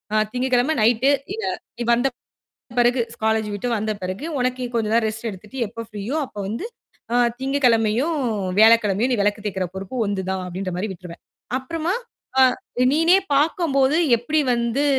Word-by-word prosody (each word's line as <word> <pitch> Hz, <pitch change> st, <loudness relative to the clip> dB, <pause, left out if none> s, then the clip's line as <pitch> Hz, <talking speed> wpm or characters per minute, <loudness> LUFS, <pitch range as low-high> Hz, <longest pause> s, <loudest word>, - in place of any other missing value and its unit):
அ -, -, +4 dB
திங்ககிழம 255 Hz, +3 st, +1 dB
night, 235 Hz, +4 st, +4 dB, 0.2 s
இவ 445 Hz, -, -5 dB, 0.4 s
நீ -, -, -1 dB
வந்த 245 Hz, +3 st, +2 dB, 0.7 s
பிறகு 245 Hz, +1 st, +3 dB, 0.2 s
காலேஜ் 220 Hz, -1 st, +1 dB
விட்டு 205 Hz, +5 st, -3 dB
வந்த 215 Hz, +1 st, -2 dB
பிறகு, 185 Hz, +8 st, -4 dB
உனக்குக் 250 Hz, -1 st, -2 dB
கொஞ்சம் 225 Hz, 0 st, +2 dB
ரெஸ்டட் 225 Hz, +1 st, -4 dB
எடுத்துட்டு 210 Hz, +6 st, -10 dB
எப்ப 230 Hz, +2 st, -7 dB
ஃப்ரீயோ 215 Hz, +6 st, -4 dB
அப்ப 210 Hz, -, -13 dB
வந்து, 230 Hz, -, -4 dB, 0.5 s
அ -, -, +4 dB, 0.2 s
திங்ககிழமயும், 265 Hz, +2 st, +2 dB, 0.4 s
வியாழக்கிழமயும், 220 Hz, +1 st, +5 dB
நீ -, -, +2 dB
வெளக்கு 205 Hz, +1 st, 0 dB
தேய்க்கிற 190 Hz, -2 st, -2 dB
பொறுப்பு 190 Hz, +6 st, -6 dB
உன்து 200 Hz, -1 st, -2 dB
தான் 190 Hz, -1 st, -2 dB
அப்படின்ற 185 Hz, +1 st, -4 dB
மாரி 210 Hz, -, -2 dB
விட்ருவேன். 175 Hz, -1 st, -11 dB, 0.4 s
அப்புறமா, 325 Hz, +7 st, -2 dB, 0.4 s
ஆ 265 Hz, -, +8 dB, 0.5 s
"நீனே 330 Hz, +5 st, +5 dB, 0.2 s
பாக்கம்போது, 285 Hz, -2 st, +2 dB, 0.2 s
எப்டி 300 Hz, +7 st, -1 dB, 0.2 s
வந்து 235 Hz, +4 st, 0 dB
235 Hz, 150 wpm, -22 LUFS, 210-265 Hz, 0.7 s, ஆ